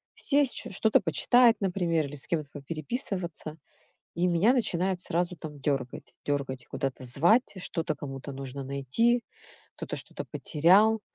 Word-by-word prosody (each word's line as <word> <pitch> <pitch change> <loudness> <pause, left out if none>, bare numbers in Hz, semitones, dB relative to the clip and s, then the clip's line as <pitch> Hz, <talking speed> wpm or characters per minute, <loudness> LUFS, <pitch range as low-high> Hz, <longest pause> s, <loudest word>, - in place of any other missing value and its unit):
Сесть 285 -2 +3
чё - - -6
что-то 220 +3 +3
почитать, 235 +7 +4
например, 175 -5 0
или 140 +1 -7
с 135 - +2
кем-то 155 -4 -2
попереписываться, 160 - -4 0.6
и 175 +1 +1
меня 180 +8 +4
начинают 185 -6 0
сразу, 175 0 -1
там, 150 -2 -9
дергать, 135 -3 -3
дергать, 140 -3 -2
куда-то 135 -1 -4
звать, 175 - +3
что-то 160 -4 -3
кому-то 135 0 -7
нужно 135 0 -6
найти, 140 - +1 0.5
кто-то - - -5
что-то - - -7
потерял, 195 +8 +4
165 Hz, 135 wpm, -28 LUFS, 140-195 Hz, 0.6 s, почитать